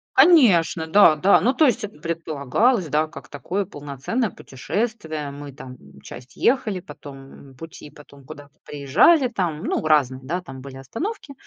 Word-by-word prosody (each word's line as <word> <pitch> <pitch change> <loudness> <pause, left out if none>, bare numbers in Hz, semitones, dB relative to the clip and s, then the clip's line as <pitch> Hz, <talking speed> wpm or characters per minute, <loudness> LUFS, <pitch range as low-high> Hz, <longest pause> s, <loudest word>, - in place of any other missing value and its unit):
Конечно, 215 - +5
да, 160 -2 +5
да. 190 +7 +4
Ну 255 +4 +2
то 310 - +4
есть 235 -5 +1
это 205 -7 -7
предполагалось, 165 - -1
да, 155 +2 0
как 155 - -13
такое 180 +8 -4
полноценное 145 - -4
путешествие. 155 - -5
Мы 145 0 -9
там, 130 -2 -11
м, - - -18
часть 125 0 -12
ехали, 220 -7 0
потом 135 -5 -13
пути, 165 -2 -11
потом 140 -1 -17
куда-то 145 +1 -12
приезжали 150 - +3
там. 175 -9 -3
Ну - - -2
разные, 135 -4 +2
да, 175 +7 -3
там 135 -7 -11
были 135 -1 -10
остановки. 280 - -6
160 Hz, 155 wpm, -22 LUFS, 140-210 Hz, -, Конечно